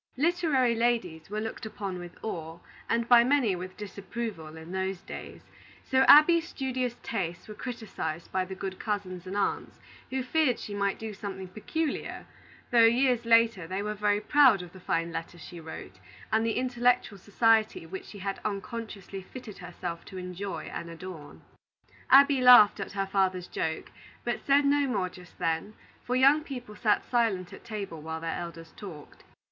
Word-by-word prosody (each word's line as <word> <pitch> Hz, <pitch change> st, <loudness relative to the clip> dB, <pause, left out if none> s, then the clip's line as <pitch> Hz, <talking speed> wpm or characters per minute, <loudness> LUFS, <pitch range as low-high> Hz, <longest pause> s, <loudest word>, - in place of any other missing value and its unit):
Literary 300 Hz, -6 st, +2 dB
ladies 225 Hz, -9 st, 0 dB
were 210 Hz, +1 st, -3 dB
looked 225 Hz, +1 st, -5 dB
upon 200 Hz, -4 st, -5 dB
with 175 Hz, -1 st, -10 dB
awe, 165 Hz, -6 st, -5 dB, 0.3 s
and 230 Hz, 0 st, +1 dB
by 240 Hz, -1 st, +8 dB
many 250 Hz, -6 st, +2 dB
with 185 Hz, +1 st, -7 dB
disapproval, 200 Hz, -5 st, -6 dB
in 160 Hz, +2 st, -10 dB
those 190 Hz, 0 st, -2 dB
days; -, -, -9 dB, 0.4 s
so 260 Hz, -, +1 dB
Abby's 330 Hz, +3 st, +8 dB
studious 255 Hz, -3 st, -2 dB
tastes 175 Hz, -6 st, -3 dB
were 215 Hz, -, -7 dB
criticised 210 Hz, -10 st, -5 dB
by 190 Hz, 0 st, +1 dB
the 190 Hz, +1 st, -7 dB
good 190 Hz, 0 st, -5 dB
cousins 190 Hz, -4 st, -4 dB
and 195 Hz, +2 st, -4 dB
aunts, 205 Hz, -, -2 dB, 0.3 s
who 260 Hz, 0 st, -2 dB
feared 260 Hz, -2 st, +2 dB
she 205 Hz, -, -7 dB
might 200 Hz, -1 st, 0 dB
do 220 Hz, -1 st, -6 dB
something 195 Hz, -2 st, -6 dB
peculiar; 270 Hz, -, -3 dB, 0.5 s
though, 240 Hz, -1 st, +6 dB
years 240 Hz, +1 st, +4 dB
later, 230 Hz, -6 st, +4 dB
they 190 Hz, +3 st, -3 dB
were 210 Hz, 0 st, -2 dB
very 205 Hz, 0 st, +1 dB
proud 250 Hz, -5 st, +5 dB
of 175 Hz, -, -12 dB
the 190 Hz, -, -12 dB
fine 170 Hz, -1 st, -1 dB
letters 165 Hz, +1 st, -6 dB
she 175 Hz, +1 st, -10 dB
wrote, 155 Hz, -, -9 dB, 0.3 s
and 220 Hz, +1 st, +3 dB
the 225 Hz, -1 st, 0 dB
intellectual 245 Hz, -4 st, +1 dB
society 220 Hz, -1 st, +2 dB
which 190 Hz, +3 st, -7 dB
she 205 Hz, -, -11 dB
had 195 Hz, 0 st, -4 dB
unconsciously 205 Hz, -2 st, -5 dB
fitted 215 Hz, +2 st, -10 dB
herself 175 Hz, -1 st, -6 dB
to 190 Hz, -, -9 dB
enjoy 180 Hz, +2 st, -5 dB
and 170 Hz, -, -5 dB
adorn. 165 Hz, -3 st, -10 dB, 0.7 s
Abby 275 Hz, 0 st, +7 dB
laughed 245 Hz, -5 st, +8 dB
at 200 Hz, -, -5 dB
her 195 Hz, -1 st, -1 dB
father's 190 Hz, -2 st, 0 dB
joke, 160 Hz, 0 st, -3 dB, 0.3 s
but 240 Hz, -1 st, -1 dB
said 280 Hz, +1 st, +4 dB
no 285 Hz, 0 st, +3 dB
more 200 Hz, -7 st, -1 dB
just 180 Hz, -1 st, -15 dB
then; 165 Hz, +6 st, -1 dB, 0.3 s
for 250 Hz, -, -1 dB
young 275 Hz, +4 st, +5 dB
people 245 Hz, -7 st, -8 dB
sat 210 Hz, -1 st, +1 dB
silent 220 Hz, -7 st, 0 dB
at -, -, -11 dB
table 200 Hz, -8 st, -6 dB
while 160 Hz, +1 st, -5 dB
their 165 Hz, 0 st, -3 dB
elders 165 Hz, -1 st, -8 dB
talked. 165 Hz, -8 st, -11 dB
205 Hz, 170 wpm, -28 LUFS, 180-240 Hz, 0.7 s, by